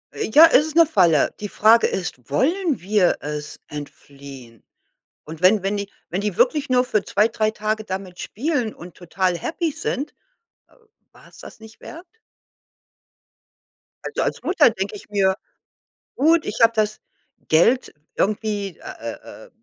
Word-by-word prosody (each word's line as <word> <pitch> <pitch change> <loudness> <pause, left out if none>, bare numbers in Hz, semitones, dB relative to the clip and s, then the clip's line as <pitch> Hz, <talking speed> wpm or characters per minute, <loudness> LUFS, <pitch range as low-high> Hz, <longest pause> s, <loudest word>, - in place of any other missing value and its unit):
Ja, 300 +9 +6
es 295 +4 +4
ist 315 - -8
'ne 335 0 +7
Falle. 175 - +3
Die 210 - -5
Frage 225 +3 +4
ist, 135 -10 -5
wollen 320 - 0
wir 195 0 +2
es 150 0 -6
entfliehen? 140 -5 -11 0.6
Und 160 +1 -10
wenn 190 +2 +4
wenn 195 +2 -1
die 200 0 -5 0.2
wenn 185 +3 -2
die 205 -3 -3
wirklich 275 +4 +2
nur 250 -1 +3
für 215 -5 0
2, 210 +2 +2
3 220 -1 -1
Tage 215 0 -3
damit 190 -2 -7
spielen 250 -2 -2
und 175 0 -12
total 180 +1 -1
happy 325 - -2
sind, 285 +1 -3 0.6
äh, - - -26 0.4
war's - - -19
das - - -13
nicht 220 0 -15
wert? 340 +3 -11 2.0
Also, - - -3
als - - -3
Mutter 345 -8 +4
denke 200 -2 -4
ich 205 - -12
mir, 195 -2 +2 0.8
gut, 320 +4 +3
ich 210 - -5
habe 230 0 +6
das 215 -1 0 0.5
Geld 230 +11 +3 0.2
irgendwie, 205 -2 -2
äh, - - -28 0.3
äh, 110 - -12
äh - - -19
210 Hz, 155 wpm, -21 LUFS, 180-250 Hz, 2.0 s, ne